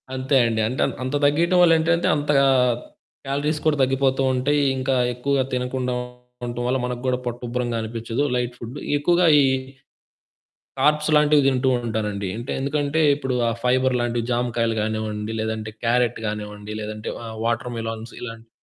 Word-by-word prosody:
అంతే 130 +1 +1
అండి. 110 -1 0
అంటే 130 - -3 0.2
అంత 130 +3 -2
తగ్గియటం 170 +5 +3
వల్ల 170 - +6
ఏంటంటే 170 +2 +1
అంతగా 145 -2 +3 0.8
క్యాలరీస్ 150 +3 -1
కూడా 150 -2 +3
తగ్గిపోతూ 135 0 +1
ఉంటాయి. 145 +3 +1 0.2
ఇంకా 130 0 0 0.2
ఎక్కువగా 135 +1 0
తినకుండా 125 0 -2 0.5
ఉంటం 120 0 -4
వల్ల 130 +1 +1
మనకు 125 -1 -4
కూడా 130 -1 +1
పొట్టుబ్బరంగా 120 0 -3
అనిపిచ్చదు 115 +3 -3
లైట్ 125 -1 -1
ఫుడ్ 120 +2 -8 0.2
ఎక్కువగా 175 +4 +3 0.2
ఈ - - +4 1.4
కార్బ్స్ 150 +1 +2
లాంటివి 150 -1 +5
తింటూ 130 -1 +2 0.2
ఉంటానండి. 105 -3 -2
అంటే 120 +2 -6
ఎందుకంటే 145 +2 0 0.2
ఇప్పుడు 130 -3 -3
ఆ - - +1
ఫైబర్ 130 0 +2
లాంటివి 120 0 -1
జాంకాయలు 120 -1 0
కానివ్వండి 110 0 -3
లేదంటే 110 0 -3
క్యారట్టు 120 0 +1
కానివ్వండి 105 0 -6
లేదంటే 105 0 -6 0.2
ఆహ్, 110 0 -7
వాటర్‌ 120 +1 -1
మిలాన్స్ 115 0 -5
ఇలాంటివి. 115 -1 -8
125 Hz, 145 wpm, -23 LUFS, 115-140 Hz, 1.4 s, వల్ల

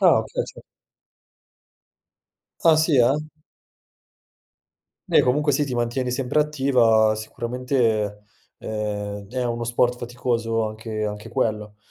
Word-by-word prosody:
Ah, - - +6
okay - - -3
sì. - - -12 2.0
Ah, 160 -2 +7
sì 155 -2 +3
eh? 125 +2 +5 2.0
Beh - - +6
comunque 145 +4 +2
sì, 145 +2 +2
ti 130 -3 -4
mantieni 120 +2 -1
sempre 125 +3 -1
attiva. 125 -7 +3
Sicuramente, 115 -2 -1 0.3
ehm, 105 -1 -4
è 125 0 -2
uno 120 0 -2
sport 120 +1 +1
faticoso 120 -2 -1
anche 110 0 -5
anche 105 +2 -6
quello. 105 -4 -2
120 Hz, 110 wpm, -23 LUFS, 110-130 Hz, 2.0 s, Ah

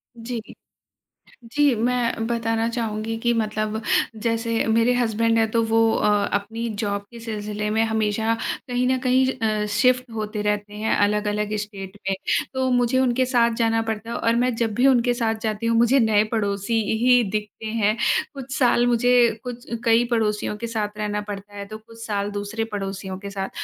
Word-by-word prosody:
जी 235 +1 -5
इ - - -10 1.0
जी, 290 -2 +3
मैं 235 0 0
बताना 230 -1 0
चाहूँगी 225 -2 -3
कि 240 0 +3
मतलब 215 -1 -1 0.4
जैसे 230 0 0
मेरे 230 +2 +3
हसबैंड 230 -1 +1
हैं, 225 -1 +2
तो 230 - +2
वो 225 0 +2
अ, 210 -1 +2
अपनी 225 +3 -2
जॉब 200 -1 -1
के 235 - -10
सिलसिले 210 -2 -4
में 220 +1 +1
हमेशा 220 0 0 0.3
कहीं 245 0 0
न 260 0 +2
कहीं 255 0 +3 0.4
अ, - - -1
शिफ़्ट 250 +4 +2
होते 215 -1 -3
रहते 210 0 -1
हैं, 215 +1 0
अलग-अलग 210 0 0
स्टेट 200 -1 -9
में। 195 - +1 0.4
तो 260 0 0
मुझे 245 +1 +2
उनके 255 0 +2
साथ 240 -2 +3
जाना 225 -1 +2
पड़ता 225 0 -4
है 235 - -3
और 230 0 +1
मैं 250 +1 +2
जब 225 -2 -1
भी 255 +2 +4
उनके 245 -2 +3
साथ 230 -2 0
जाती 215 +1 -2
हूँ 230 0 +2
मुझे 240 +4 +4
नए 220 -3 +4
पड़ोसी 205 +1 0 0.2
ही 250 -1 +5
दिखते 210 +1 -4
हैं। 215 -1 +1 0.4
कुछ 270 -1 -6
साल 240 -2 +3
मुझे 245 +1 +3 0.3
कुछ 245 -1 -7 0.2
कई 230 +1 +4
पड़ोसियों 210 -2 0
के 235 - -4
साथ 210 -2 -3
रहना 210 0 -2
पड़ता 205 0 -7
है 200 0 -6
तो 215 +1 -7
कुछ 230 +1 -13
साल 205 -2 -1
दूसरे 205 +2 -3
पड़ोसियों 195 -1 -4
के 200 0 -7
साथ। 195 -1 -4
225 Hz, 180 wpm, -23 LUFS, 210-235 Hz, 1.0 s, ही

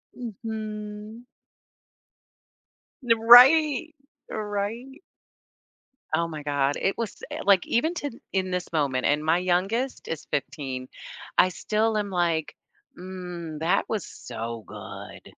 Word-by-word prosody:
Mhm. 215 -1 -6 1.8
N 230 -2 +3
right. 280 +6 +7 0.4
Right. 215 +7 -4 1.2
Oh 170 0 +1
my 155 -2 -7
god, 145 -1 +1
it 195 - 0
was, 230 -3 -5
eh - - -4
like, 195 -2 +4
even 315 +9 +1
to 290 -4 -3 0.2
in 185 -1 -1
this 180 -1 -3
moment, 135 -4 0
and 150 +1 +2
my 160 +2 +3
youngest 195 +9 0
is 165 - -5
15, 135 -2 -3 0.5
I 185 - +6
still 215 +4 0
am, 205 -1 -1
like, 170 -4 0 0.4
"Mm, 180 -4 -7
that 175 +5 +1
was 215 -4 -2
so 115 -1 -7
good." - - -10
190 Hz, 115 wpm, -26 LUFS, 160-225 Hz, 1.8 s, right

